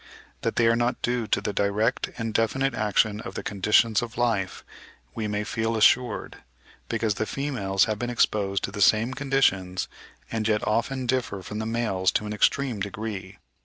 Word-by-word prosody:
That - - -1
they 115 - +3
are 115 0 +4
not 120 +1 0
due 120 -2 0
to - - +1
the 105 - -3
direct 105 +4 0
and 115 -2 -3
definite 135 +4 +1
action 105 -1 +1
of - - -8
the - - -4
conditions 105 +2 +3
of 115 -2 -6
life, 110 -6 0 0.5
we 110 -2 -3
may 105 0 -1
feel 115 0 -1
assured, 120 +1 +2 0.5
because 115 -2 0
the 110 +1 -3
females 105 -9 0
have 110 -2 -2
been 120 - -2
exposed 100 -5 +1
to - - -2
the 105 0 -5
same 110 +6 +4
conditions, 110 -10 +1 0.4
and 110 -1 -1
yet 105 -1 +1
often 125 +4 0
differ 120 -6 -1
from 105 +3 -5
the 110 - -3
males 110 -5 +1
to 105 - 0
an 105 - -4
extreme 125 +2 +1
degree. 100 -1 -5
110 Hz, 180 wpm, -26 LUFS, 105-120 Hz, 0.5 s, are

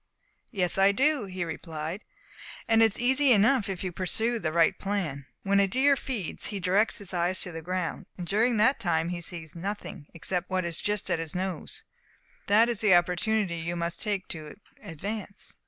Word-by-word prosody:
"Yes, 190 -4 +3
I 195 +1 +6
do," 275 +2 +2
he 185 -2 -4
replied; 160 +2 -5 0.6
"and 225 -1 +4
it 225 -2 +5
is - - -5
easy 265 +3 +3
enough 220 +1 +3
if 190 -1 -4
you 185 - -2
will 170 - -19
pursue 225 +6 0
the 155 -6 -2
right 165 0 +3
plan. 170 -9 -3 0.2
When 200 0 +3
a 200 - +4
deer 270 +7 +3
feeds, 240 - -3
he 205 -2 -4
directs 195 +4 +2
his 195 -2 -9
eyes 180 +1 0
to 180 - -3
the 165 -1 -6
ground; 180 +1 -3
and 180 - -5
during 220 +6 +2
that 260 +5 +4
time 170 -5 0
he 175 -1 -4
sees 165 -2 -7
nothing 180 -4 -6
except 180 +2 -1
what 185 -1 0
is 170 -1 -3
just 210 -1 -1
at - - +1
his 165 0 -5
nose. 185 -3 -4 0.6
That 215 +3 +5
is 235 -3 -1
the 210 -5 +6
opportunity 180 +2 +1
you 165 +1 -3
must 170 0 -3
take 205 -3 -2
to 155 -3 -7 0.3
advance. 200 +5 -4
190 Hz, 195 wpm, -28 LUFS, 170-215 Hz, 0.6 s, I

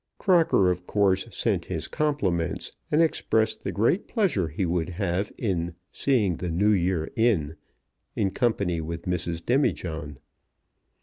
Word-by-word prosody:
Crocker, 165 - +4
of 90 0 -5
course, 100 -2 +2
sent - - -1
his - - -4
compliments, 100 - -1 0.2
and 155 +3 +4
expressed 110 -8 0
the - - -2
great 115 - +1
pleasure 175 - +1
he 80 +5 -2
would 85 -1 -1
have 95 +2 -2
in 85 -6 -2 0.2
"seeing 105 - +1
the 90 - -3
New 100 +6 +2
Year 90 -4 0
in" 100 -11 +2 0.6
in 95 - +1
company 100 -9 0
with 85 +1 -5
Mrs. 85 -2 -3
Demijohn. 80 - 0
95 Hz, 135 wpm, -26 LUFS, 85-115 Hz, 0.6 s, Crocker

